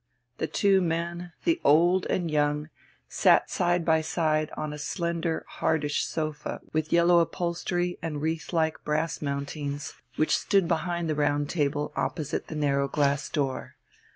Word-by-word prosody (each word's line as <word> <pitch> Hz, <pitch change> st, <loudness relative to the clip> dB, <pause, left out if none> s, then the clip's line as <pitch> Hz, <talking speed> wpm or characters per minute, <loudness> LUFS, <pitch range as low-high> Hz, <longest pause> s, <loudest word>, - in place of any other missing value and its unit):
The -, -, 0 dB
two 195 Hz, -2 st, +3 dB
men, 170 Hz, +1 st, -2 dB
the 340 Hz, 0 st, +1 dB
old 175 Hz, +5 st, +4 dB
and 170 Hz, -3 st, -1 dB
young, 150 Hz, 0 st, +1 dB, 0.4 s
sat -, -, +3 dB
side 175 Hz, -1 st, +1 dB
by 160 Hz, -1 st, +4 dB
side 155 Hz, -1 st, 0 dB
on 155 Hz, -1 st, -3 dB
a 150 Hz, -, -7 dB
slender, 170 Hz, +1 st, -2 dB
hardish 150 Hz, -2 st, 0 dB
sofa 155 Hz, -1 st, -3 dB
with 155 Hz, 0 st, -1 dB
yellow 170 Hz, 0 st, +5 dB
upholstery 175 Hz, +1 st, -1 dB
and 160 Hz, -3 st, -3 dB
wreath 160 Hz, +2 st, -2 dB
like 160 Hz, -2 st, 0 dB
brass 155 Hz, +2 st, -1 dB
mountings, 140 Hz, 0 st, -4 dB, 0.2 s
which 155 Hz, -, +2 dB
stood 195 Hz, -4 st, +2 dB
behind 170 Hz, 0 st, -1 dB
the 155 Hz, -, +1 dB
round 145 Hz, -1 st, 0 dB
table 145 Hz, -2 st, -1 dB
opposite 140 Hz, +3 st, -2 dB
the 160 Hz, -, -6 dB
narrow 140 Hz, -2 st, +1 dB
glass 140 Hz, 0 st, +1 dB
door. 135 Hz, -3 st, -2 dB
160 Hz, 150 wpm, -27 LUFS, 150-170 Hz, 0.4 s, yellow